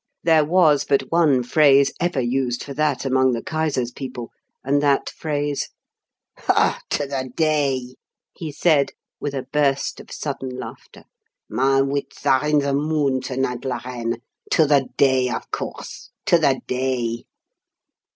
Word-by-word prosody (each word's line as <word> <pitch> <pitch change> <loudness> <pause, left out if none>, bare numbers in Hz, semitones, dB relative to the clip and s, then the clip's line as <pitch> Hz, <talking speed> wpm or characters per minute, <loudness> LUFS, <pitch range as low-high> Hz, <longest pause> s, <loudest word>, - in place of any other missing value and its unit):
There 160 -2 +5
was 155 -2 +4
but 140 -1 0
one 155 -7 +3
phrase 140 +1 +5
ever 175 -5 0
used 125 0 -1
for 140 - -7
that 145 -2 0
among 130 -1 +3
the 115 - -3
Kaiser's 150 -6 -1
people, 125 -2 -7 0.3
and 140 +2 +2
that 140 -1 +2
phrase 145 -2 -2 0.7
"'To 145 - +1
the 135 -2 -4
day!'" 140 -6 +1 0.4
he 160 -3 -6
said, 145 -2 +2 0.3
with 145 -1 -4
a 135 - -3
burst 140 -2 +1
of - - -13
sudden 135 -3 -4
laughter. - - -10 0.4
"My 135 +4 +2
wits 140 +1 -3
are 130 +3 +3
in 150 0 +3
the 140 -1 +1
moon 145 -2 +1
to 130 0 -5
night, 125 -2 -1
la 125 -3 -2
reine. 120 -2 -4 0.3
'To 160 - +4
the 140 -3 +3
day,' 130 -2 +3
of - - -5
course - - -6 0.2
'To 170 - +4
the 140 -4 +2
day!'" 125 -2 -2
135 Hz, 150 wpm, -22 LUFS, 130-150 Hz, 0.7 s, There